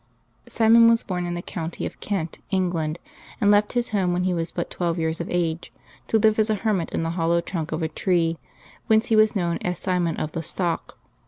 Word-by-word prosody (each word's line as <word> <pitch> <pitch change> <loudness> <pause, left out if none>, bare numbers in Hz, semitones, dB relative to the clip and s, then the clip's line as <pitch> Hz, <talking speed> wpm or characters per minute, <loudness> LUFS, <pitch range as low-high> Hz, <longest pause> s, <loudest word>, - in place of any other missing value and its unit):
|rMON 230 +1 +6
was 230 0 +3
born 180 -2 -3
in 175 - -3
the 175 - -5
county 165 -1 -5
of - - -7
Kent, 185 -6 -3
England, 175 -5 -1 0.4
and 205 - +4
left 205 0 +3
his 245 -1 0
home 190 -4 +1
when 180 +1 0
he 185 0 +1
was 165 -1 -1
but 170 - -4
twelve 170 -1 -1
years 160 0 -1
of 170 - -5
age, 170 -2 -1 0.4
to 225 - +3
live 215 0 +3
as 215 0 +2
a 215 - +2
hermit 195 -7 +1
in - - -1
the 165 - -1
hollow 170 0 +1
trunk 170 -2 -4
of 160 +1 -2
a - - +1
tree, 165 0 0 0.5
whence 220 0 +3
he 225 - +4
was 215 0 +4
known 170 -3 0
as 180 0 -2
Simon 180 -3 -1
of 155 - -3
the 165 - -3
Stock. 170 +1 -3
175 Hz, 225 wpm, -24 LUFS, 165-205 Hz, 0.5 s, |rMON